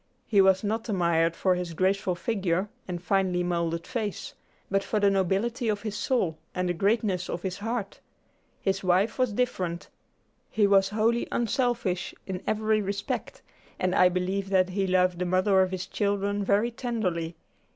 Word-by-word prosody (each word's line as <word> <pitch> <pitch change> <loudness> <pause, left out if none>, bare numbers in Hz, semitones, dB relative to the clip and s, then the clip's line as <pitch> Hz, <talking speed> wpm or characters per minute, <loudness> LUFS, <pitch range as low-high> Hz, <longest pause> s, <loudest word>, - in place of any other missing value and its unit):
He 205 -3 +4
was 190 0 +4
not 225 +3 -2
admired 170 -4 +2
for 185 - +2
his 180 -2 -4
graceful 190 0 +1
figure 190 -1 -1 0.2
and 180 -1 -4
finely 185 -1 +1
moulded 170 -1 -1
face, 220 -6 -4 0.4
but 195 0 +2
for 215 - -1
the 200 -1 +4
nobility 200 +6 0
of 210 -1 -1
his 215 -2 -4
soul 205 -8 0 0.2
and 180 0 0
the 175 - +1
greatness 195 0 0
of 175 - -4
his 190 0 -3
heart. 225 -1 -3 0.6
His 195 0 0
wife 190 +6 +2
was 255 -3 +2
different. 185 -7 -2 0.6
He 215 -1 +2
was 195 -1 +4
wholly 225 +3 +1
unselfish 235 -6 -1
in 185 -1 -4
every 215 0 +1
respect, 200 0 -4 0.3
and 185 0 0
I 180 -1 +5
believe 185 +2 -2
that 185 -1 +3
he 195 +1 -1
loved 180 -1 +2
the 180 - 0
mother 185 +2 +3
of 185 - +2
his 185 0 -4
children 200 0 -1
very 205 +4 +2
tenderly. 185 -9 -2
195 Hz, 165 wpm, -27 LUFS, 180-215 Hz, 0.6 s, I